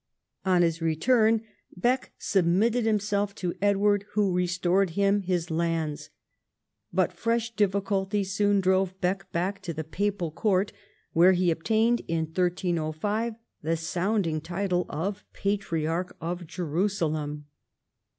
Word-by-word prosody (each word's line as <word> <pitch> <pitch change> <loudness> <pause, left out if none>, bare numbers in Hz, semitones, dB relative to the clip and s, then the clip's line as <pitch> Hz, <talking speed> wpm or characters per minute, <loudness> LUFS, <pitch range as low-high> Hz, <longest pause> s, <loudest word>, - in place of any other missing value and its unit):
On 180 -2 +4
his 165 0 0
return, 220 +8 +3 0.3
Bek 245 +8 +1
submitted 210 +6 +2
himself 205 -1 0
to 180 -2 -2
Edward, 205 0 +3
who 205 -3 +2
restored 180 +1 +1
him 200 0 +3
his 175 -3 -1
lands. 160 -2 -1 0.8
But - - +1
fresh 230 0 -1
difficulties 195 -1 0
soon 205 0 +3
drove 190 0 +1
Bek 190 +1 -1
back 185 +4 -1
to 170 -5 -5
the 160 - -3
papal 185 +1 -2
court, 190 +3 +1 0.4
where 175 +3 +6
he 180 -1 +2
obtained 220 +8 +2
in 165 -1 0
1305 180 +5 -1 0.3
the 165 +2 0
sounding 170 -1 -1
title 180 +2 -1
of 185 +7 -3
Patriarch 180 -3 -2
of 175 +1 -4
Jerusalem. 155 -4 -2
185 Hz, 120 wpm, -27 LUFS, 170-205 Hz, 0.8 s, where